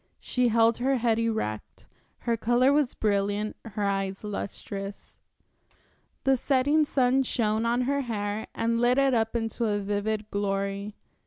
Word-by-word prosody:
She 250 Hz, -1 st, 0 dB
held 230 Hz, 0 st, +3 dB
her 265 Hz, +2 st, +1 dB
head 230 Hz, -2 st, +1 dB
erect, 220 Hz, -, -3 dB, 0.4 s
her 235 Hz, -, 0 dB
color 240 Hz, +4 st, +3 dB
was 290 Hz, -3 st, +1 dB
brilliant, 205 Hz, 0 st, 0 dB
her 210 Hz, -2 st, -4 dB
eyes 195 Hz, 0 st, -1 dB
lustrous. 200 Hz, -1 st, -6 dB, 1.1 s
The 270 Hz, 0 st, +4 dB
setting 285 Hz, +4 st, +2 dB
sun 260 Hz, -1 st, +2 dB
shone 225 Hz, -3 st, 0 dB
on 240 Hz, +2 st, +1 dB
her 280 Hz, +3 st, 0 dB
hair 210 Hz, -3 st, -3 dB
and 230 Hz, +1 st, 0 dB
lit 245 Hz, +1 st, +3 dB
it 275 Hz, -1 st, +3 dB
up 225 Hz, 0 st, +1 dB
into 230 Hz, +1 st, -1 dB
a 210 Hz, -2 st, +1 dB
vivid 205 Hz, +1 st, -2 dB
glory. 200 Hz, 0 st, -2 dB
225 Hz, 145 wpm, -27 LUFS, 205-245 Hz, 1.1 s, The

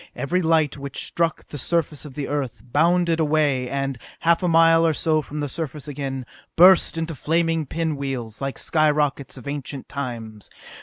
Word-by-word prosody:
Eery 155 Hz, +8 st, 0 dB
lights 160 Hz, -3 st, +2 dB
which 140 Hz, -1 st, -2 dB
struck 165 Hz, -1 st, -1 dB
the 145 Hz, -, -8 dB
surface 155 Hz, 0 st, -1 dB
of 140 Hz, -3 st, -10 dB
the 145 Hz, -2 st, -3 dB
Earth, 145 Hz, -4 st, -3 dB
bounded 170 Hz, +2 st, +3 dB
away 145 Hz, -5 st, +1 dB
and, 135 Hz, -2 st, -2 dB, 0.2 s
half 170 Hz, 0 st, +3 dB
a 180 Hz, -, 0 dB
mile 165 Hz, 0 st, +5 dB
or 165 Hz, -1 st, +3 dB
so 155 Hz, +1 st, +1 dB
from 150 Hz, 0 st, -6 dB
the 145 Hz, -, -1 dB
surface 150 Hz, 0 st, -5 dB
again, 135 Hz, -3 st, -4 dB, 0.3 s
burst 180 Hz, -1 st, +6 dB
into 165 Hz, 0 st, -2 dB
flaming 165 Hz, +1 st, 0 dB
pin 160 Hz, 0 st, -2 dB
wheels, 130 Hz, -5 st, -5 dB
like 135 Hz, 0 st, -3 dB
skyrockets 150 Hz, -3 st, +1 dB
of 130 Hz, -, -11 dB
ancient 140 Hz, -1 st, -5 dB
times. 115 Hz, -6 st, -6 dB
150 Hz, 170 wpm, -23 LUFS, 135-165 Hz, 0.3 s, burst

